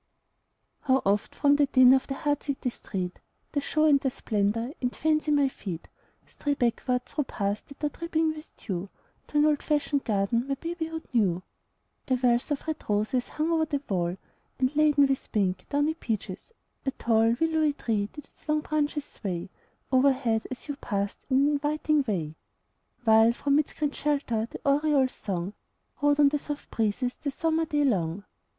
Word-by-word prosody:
How 265 -2 +2
oft 200 +1 +1
from 285 -1 +4
the 290 -1 +4
din 255 -2 +7
of 265 - +2
the 270 - -3
hard 290 0 0
city 270 -3 -2
street, 185 -5 -5 0.3
The 285 - 0
show 305 +2 +1
and 290 -3 +6
the 270 - 0
splendor, 220 +1 -1
in 250 - +1
fancy, 310 +3 0
my 290 -2 +4
feet 185 -10 -7 0.4
Stray 290 -1 -2
backward 250 0 0
through 295 - -2
paths 205 -3 -2
that 280 +2 -14
are 295 - +2
dripping 325 +1 -1
with 305 0 -11
dew, 190 -1 -4 0.4
To 300 - -2
an 295 - +5
old 300 -1 +2
fashioned 290 -2 0
garden 220 +4 0
my 275 - 0
babyhood 325 +1 -4
knew. 185 -6 +2 0.6
A 260 - +3
wealth 245 +1 +2
of 290 -2 -2
red 315 - -1
roses 215 +4 +1
hung 310 +2 -1
over 320 -1 +2
the 285 -2 -2
wall, 175 -2 -1 0.4
And, 260 +2 0
laden 295 -2 +5
with 270 -1 -2
pink, 190 -4 0
downy 290 +2 +1
peaches, 220 - -5 0.3
a - - 0
tall 230 -4 +1
And 230 +1 +2
willowy 315 -2 +2
tree 210 -6 -1
did 295 - -10
its - - -24
long 305 0 +2
branches 300 -1 -1
sway 180 -9 -5 0.4
O'erhead, 255 -4 +3
as 255 +2 -8
you 285 -1 -4
passed, 200 -6 -2
in 265 0 +4
an 280 - +4
inviting 300 +1 +1
way; 165 -8 -1 0.7
While 225 0 +6
from 280 +4 +2
its 300 - -2
green 295 -2 -1
shelter 275 -7 -1
the - - -9
oriole's 280 -2 +3
song 190 -1 -4 0.5
Rode 290 0 +3
on 290 -1 +7
the 295 +1 -1
soft 290 0 -7
breezes 230 +3 0
the 290 - -1
summer 325 +3 0
day 295 -1 +1
long. 190 - 0
270 Hz, 180 wpm, -27 LUFS, 220-295 Hz, 0.7 s, din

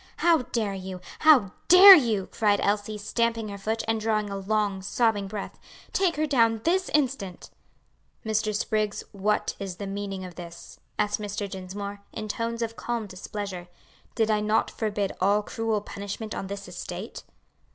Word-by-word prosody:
"How 340 -1 +4
dare 225 -5 -2
you! 190 -1 -6 0.2
how 275 -12 +6 0.2
dare 385 +3 +11
you!" 230 - +3
cried 205 -2 +2
Elsie, 205 +1 0
stamping 230 +1 -1
her 200 - -6
foot, 220 +3 -2
and 225 -1 0
drawing 215 -2 0
a - - -3
long, 200 0 -1
sobbing 205 0 +1
breath. 205 0 -6 0.3
"Take 370 -3 +2
her 310 +1 +1
down 230 -6 +3
this 365 +2 +1
instant." 255 -11 -1 0.7
"Mr. 215 -1 0
Spriggs, 215 0 -1
what 205 +1 0
is 195 -3 -5
the 200 - -6
meaning 195 -1 -4
of 180 - -9
this?" 170 -1 -11 0.2
asked 210 0 0
Mr. 205 0 -4
Dinsmore, 200 +1 -7
in 215 -1 -5
tones 230 +2 -2
of 230 0 -4
calm 235 -2 -3
displeasure; 190 -1 -6 0.5
"did 220 -1 +2
I 210 - +2
not 215 +1 +1
forbid 205 -3 -2
all 205 +2 +3
cruel 225 -1 -2
punishment 205 +2 -6
on 195 - -4
this 200 0 -6
estate?" 180 +3 -7
210 Hz, 160 wpm, -26 LUFS, 200-225 Hz, 0.7 s, dare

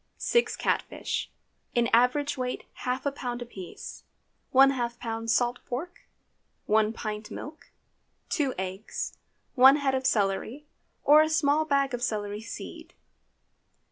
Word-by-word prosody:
6 475 0 +1
cat - - +1
fish, - - -4 0.5
in 240 -1 +3
average 250 +5 +3
weight 255 -2 -3
half 255 +2 -3
a 280 - +1
pound 245 -3 -4
apiece. 215 -7 -9 0.5
½ 260 -3 +4
lb. 225 -1 -4
salt 240 +2 +2
pork. 340 +10 -6 0.6
1 215 0 +3
pint 215 -1 -5
milk. 305 +6 -9 0.6
2 285 -6 0
eggs. 190 +3 -4 0.4
1 265 +2 +8
head 280 -2 0
of 260 0 +1
celery, 220 +6 0 0.4
or 300 +2 +7
a 310 - +2
small 310 -1 +2
bag 275 -3 +1
of 245 - -3
celery 210 -3 -2
seed. 230 - -9
250 Hz, 130 wpm, -28 LUFS, 225-280 Hz, 0.6 s, 1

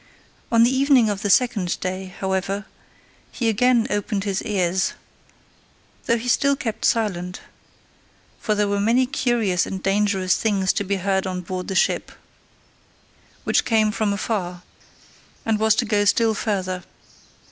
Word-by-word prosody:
On 230 -1 +5
the 250 +3 +3
evening 265 -5 +4
of 200 -1 -4
the 205 - -1
second 205 -5 +2
day, 185 +1 -3
however, 190 +2 -3 0.7
he 235 - -2
again 235 +1 +3
opened 205 -1 -1
his 200 -2 -2
ears, 185 -2 0 1.1
though 235 - +3
he 235 +2 -6
still 280 +3 +3
kept 225 -5 -4
silent: 180 -5 -1 1.0
for 215 - 0
there 210 0 +1
were 200 0 0
many 235 +5 +3
curious 235 -8 0
and 190 -1 -6
dangerous 195 -2 +1
things 195 -4 +1
to - - -1
be 200 +1 -1
heard 190 0 -1
on 185 -1 -3
board 180 +1 -5
the 190 - -4
ship, - - +1 1.3
which - - +2
came 220 -2 +2
from 215 -1 0
afar, 185 -4 -3 0.8
and 220 -2 +1
was 220 0 +3
to 245 +1 0
go 210 -1 +1
still 220 +2 +3
further. 185 -4 -2
205 Hz, 145 wpm, -22 LUFS, 190-225 Hz, 1.3 s, On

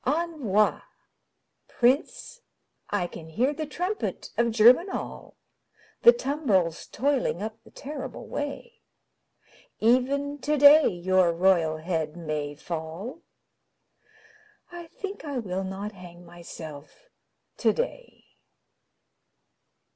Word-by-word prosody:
Envoi 280 - +1 0.9
Prince, 270 - 0 0.5
I 205 -3 0
can 165 -2 -9
hear 245 - +1
the 310 +1 -5
trumpet 365 +8 -4
of 235 0 +2
Germinal, 245 - +2 0.6
The 475 - +9
tumbrils 270 - 0
toiling 255 -6 0
up 220 +1 -6
the - - -17
terrible 280 -1 -7
way; 290 +12 -6 1.0
Even 275 +5 +1
today 295 +1 +6
your 185 0 +2
royal 170 -2 +2
head 160 -1 -3
may 150 -3 -4
fall 170 - -6 1.5
I 345 -1 -9
think 395 +4 -7
I 285 -3 -4
will 190 -5 -3
not 190 +2 -5
hang 175 -3 -13
myself 170 - -11 0.4
today. - - -2
225 Hz, 95 wpm, -26 LUFS, 175-290 Hz, 1.5 s, The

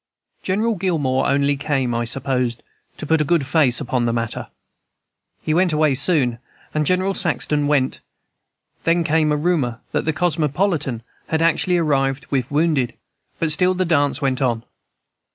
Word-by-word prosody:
"General 215 +5 0
Gillmore 160 -9 0
only 140 +1 +2
came, 135 -4 -1
I 120 0 -1
supposed, 125 -2 -2 0.3
to - - -6
put 160 +1 +2
a - - +3
good 155 -1 +1
face 140 -4 +3
upon 120 -1 -1
the 115 - +1
matter. 115 -1 -3 1.0
He 155 - 0
went 175 0 +2
away 155 -2 +2
soon, 130 -4 +3 0.3
and 150 -1 0
General 185 +2 +1
Saxton 150 -5 0
went; 140 -3 +1 0.8
then 170 +1 +2
came 155 -1 +1
a 150 - +1
rumor 145 -7 0
that - - -1
the 160 - +1
Cosmopolitan 155 - -1 0.2
had 160 0 0
actually 175 +2 +2
arrived 135 -4 0
with 130 -3 -1
wounded, 145 -4 0 0.4
but 165 -2 0
still 180 +4 +3
the 185 0 0
dance 145 -4 +1
went 130 -1 0
on. 120 -3 0
150 Hz, 155 wpm, -20 LUFS, 130-165 Hz, 1.0 s, a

